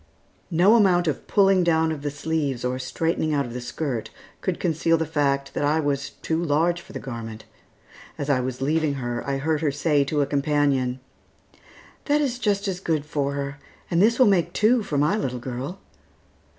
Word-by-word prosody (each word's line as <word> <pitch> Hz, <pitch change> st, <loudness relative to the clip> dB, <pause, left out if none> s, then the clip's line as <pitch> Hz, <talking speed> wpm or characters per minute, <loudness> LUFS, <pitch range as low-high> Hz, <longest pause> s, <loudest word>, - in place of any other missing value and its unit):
No 180 Hz, +5 st, +5 dB
amount 180 Hz, -6 st, +4 dB
of 150 Hz, -, -2 dB
pulling 195 Hz, -2 st, +4 dB
down 160 Hz, -1 st, +2 dB
of 155 Hz, -3 st, -4 dB
the 145 Hz, -, -2 dB
sleeves 145 Hz, -3 st, -2 dB
or 125 Hz, +1 st, -1 dB
straightening 155 Hz, +3 st, -1 dB
out 140 Hz, -1 st, +1 dB
of 120 Hz, -, -8 dB
the 125 Hz, -, -5 dB
skirt 120 Hz, -2 st, -3 dB, 0.3 s
could 185 Hz, -3 st, -2 dB
conceal 165 Hz, -1 st, +2 dB
the 160 Hz, -, -1 dB
fact 140 Hz, -3 st, 0 dB
that -, -, -2 dB
I 150 Hz, +2 st, +2 dB
was 140 Hz, -2 st, -1 dB
too 165 Hz, +1 st, 0 dB
large 170 Hz, +3 st, +1 dB
for -, -, -15 dB
the -, -, -5 dB
garment. 115 Hz, -4 st, -7 dB, 0.7 s
As 145 Hz, -, -4 dB
I 140 Hz, -3 st, +2 dB
was 125 Hz, 0 st, -4 dB
leaving 155 Hz, 0 st, +1 dB
her, 120 Hz, -2 st, -3 dB
I 135 Hz, -, 0 dB
heard 155 Hz, +2 st, 0 dB
her 155 Hz, -, +2 dB
say 145 Hz, 0 st, +2 dB
to 145 Hz, +1 st, 0 dB
a -, -, +2 dB
companion, 140 Hz, -3 st, +1 dB, 1.0 s
"That 295 Hz, 0 st, +2 dB
is 260 Hz, -4 st, -1 dB
just 205 Hz, -3 st, 0 dB
as 185 Hz, -2 st, -2 dB
good 160 Hz, -5 st, -1 dB
for 140 Hz, -2 st, -1 dB
her, 140 Hz, 0 st, -4 dB, 0.3 s
and 170 Hz, 0 st, +3 dB
this 230 Hz, +3 st, +4 dB
will 255 Hz, -, +6 dB
make 175 Hz, -5 st, +2 dB
two 230 Hz, +3 st, +3 dB
for 150 Hz, -8 st, -3 dB
my 150 Hz, +7 st, +3 dB
little 130 Hz, -, -2 dB
girl." 130 Hz, +9 st, -5 dB
150 Hz, 195 wpm, -24 LUFS, 140-170 Hz, 1.0 s, will